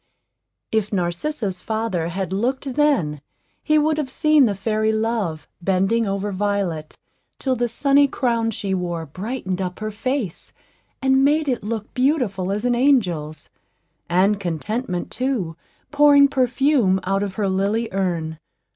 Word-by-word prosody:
If 220 -2 0
Narcissa's 190 - -2
father 220 -6 -2
had 190 +2 -3
looked 255 +6 -1
then, 245 - +1 0.4
he 305 -1 +2
would 310 0 +2
have 285 -3 -2
seen 305 -1 +4
the 205 - -1
fairy 215 +2 0
Love 220 -7 -1
bending 195 +5 +1
over 200 +1 -2
Violet 190 -6 -2 0.4
till 260 -1 0
the 240 0 0
sunny 280 +4 +3
crown 235 -4 0
she 200 -3 -3
wore 175 -3 -2
brightened 190 - -4
up 180 -1 -3
her 215 0 -4
face, 225 - -3 0.5
and 265 0 +4
made 300 +2 +3
it 250 -5 -1
look 215 0 -4
beautiful 250 - 0
as 210 +4 -2
an 245 - +3
angel's, 180 - +1 0.6
and 195 +4 +3
Contentment, 180 - -3
too, 245 -11 -2 0.4
pouring 290 -1 +6
perfume 260 -6 +2
out 195 +1 0
of 200 -2 -3
her 205 -2 0
lily 200 +4 0
urn. 170 -5 -2
215 Hz, 140 wpm, -22 LUFS, 185-260 Hz, 0.6 s, pouring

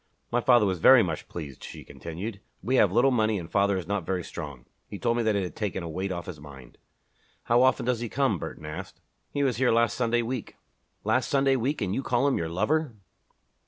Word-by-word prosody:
"My 120 +1 +2
father 120 -3 +5
was 95 -3 -1
very 130 +7 +7
much 80 -4 -4
pleased," 75 -6 -8
she - - -9
continued. 100 +6 -7 0.2
"We 130 +2 +1
have 100 - +5
little 120 +6 +4
money 110 -3 +2
and 85 -3 -6
father 100 +2 +2
is 90 - -4
not 100 0 -2
very 90 +1 -2
strong. 70 -8 -8 0.2
He 100 - -7
told 115 +2 0
me 120 - +1
that 110 -2 +1
it 100 - 0
had 90 - -6
taken 100 -4 -3
a - - -5
weight 95 +4 -3
off 85 -2 -4
his 85 -5 -8
mind." 70 -4 -13 0.6
"How 120 +1 +3
often 130 -2 +3
does 125 -2 0
he 120 -1 -4
come?" 130 -9 +1
Burton 75 - -7
asked. 75 0 -7 0.3
"He 145 - -1
was 130 -5 +1
here 130 0 +3
last 115 -1 +2
Sunday 120 -1 +1
week." 120 0 -5 0.5
"Last - - +1
Sunday 135 -1 +3
week! 130 +1 -1
And 95 -1 -1
you 130 - -1
call 130 +1 +1
him 140 - +1
your 80 -1 -2
lover!" 140 - 0
105 Hz, 230 wpm, -27 LUFS, 90-125 Hz, 0.6 s, very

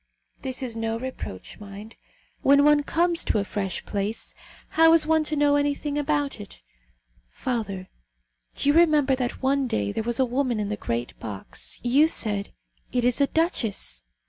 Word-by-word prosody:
This 260 +1 -4
is 240 -3 -4
no 225 0 -2
reproach, 240 - -7
mind. 205 +2 -10 0.5
When 280 +1 +5
one 295 0 +5
comes 335 +3 +2
to - - +1
a 205 - +1
fresh 195 -2 -4
place, 205 +2 -3 0.4
how 325 +1 +5
is 325 -2 +5
one 315 0 +3
to 305 - +1
know 290 0 +3
anything 290 0 -1
about 290 -3 -1
it? 205 - -11 0.7
Father, 200 - -4 0.7
do - - +2
you 285 - +5
remember 305 -5 +4
that 250 0 -4
one 270 0 +2
day 100 - -1
there - - -2
was 235 +2 -1
a 260 - +4
woman 250 -2 -1
in 205 -1 -2
the 210 - -1
great 120 - -3
box; 105 -3 -6
you 270 +6 +4
said: 205 -9 +1 0.4
'It 245 -1 0
is 250 +3 +2
a 280 - +4
duchess.' 230 - -1
255 Hz, 170 wpm, -25 LUFS, 210-290 Hz, 0.7 s, When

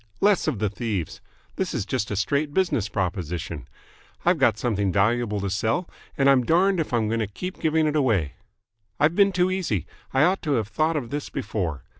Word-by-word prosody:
"Less 200 -4 +3
of 150 -7 0
the 105 +1 0
thieves. 105 -6 -3 0.4
This - - -2
is - - -1
just 110 -2 -2
a 105 - -2
straight 140 - 0
business 170 - +1
proposition. 90 -5 -3 0.6
I've - - +3
got - - +3
something 105 -5 0
valuable 105 +2 +1
to 100 - -2
sell, 115 - 0 0.3
and 135 - +3
I'm 135 -2 +5
darned 180 +6 +3
if 160 - -2
I'm 115 -3 +1
going 115 +1 0
to 110 - -1
keep 180 - -7
giving 160 0 +2
it 155 0 0
away. 110 - +1 0.7
I've 155 +3 +3
been 200 0 +5
too 180 0 +1
easy. 165 - -1 0.3
I 135 - +3
ought 185 +4 +2
to 150 -3 0
have 110 -5 0
thought 155 +5 +1
of 135 -5 -3
this 145 0 -4
before. 85 - -3
120 Hz, 200 wpm, -24 LUFS, 100-155 Hz, 0.7 s, I'm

